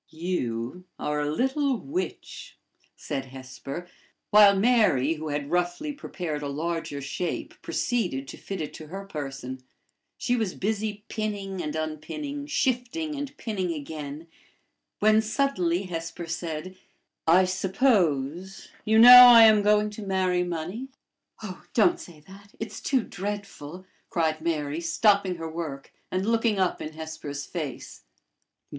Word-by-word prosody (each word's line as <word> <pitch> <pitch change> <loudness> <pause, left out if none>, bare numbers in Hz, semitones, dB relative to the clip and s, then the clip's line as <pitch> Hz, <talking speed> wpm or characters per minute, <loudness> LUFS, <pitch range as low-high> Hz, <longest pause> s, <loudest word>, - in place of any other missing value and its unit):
"You 160 -3 -3
are 150 0 -2
a 145 - -1
little 265 - +1
witch!" 335 +11 -6 0.4
said 135 -3 -4
Hesper; 135 +5 -8 0.4
while 205 -1 +8
Mary, 200 - +3
who 155 -1 -6
had 145 0 -3
roughly 180 - -1
prepared 175 - -5
a 145 - -3
larger 155 0 -3
shape, 145 +5 -4
proceeded 175 - -1
to - - -7
fit 195 -3 -6
it 150 - -5
to 155 - -10
her 195 +5 -7
person. 135 -6 -6 0.6
She 245 - 0
was 220 -6 -1
busy 210 0 -2
pinning 200 -4 -3
and 150 -2 -4
unpinning, 280 - -5
shifting 265 +3 -1
and 285 -1 -6
pinning 195 -6 -2
again, 150 +1 -7 0.7
when 215 +1 +4
suddenly 210 -7 0
Hesper 170 -1 -5
said: 165 +1 -5 0.5
"I 180 +3 +6
suppose 185 - 0
you 220 +1 +3
know 250 +2 +12
I 235 -2 +10
am 215 -1 +7
going 210 0 +3
to 210 - -8
marry 185 -2 +1
money?" 180 +8 -4 0.6
"Oh! - - -7
don't 345 0 +4
say 160 -4 -12
that. 195 +5 -16
It's 225 - -6
too 260 -4 +1
dreadful!" 195 -4 -6 0.2
cried 160 -2 0
Mary, 155 -1 -2
stopping 195 +2 +2
her 165 -1 -6
work, 160 -4 -6 0.2
and 185 +1 -1
looking 225 -1 +2
up 185 -2 0
in 155 - -6
Hesper's 155 -2 -6
face. 155 -8 -6
180 Hz, 135 wpm, -26 LUFS, 155-215 Hz, 0.7 s, know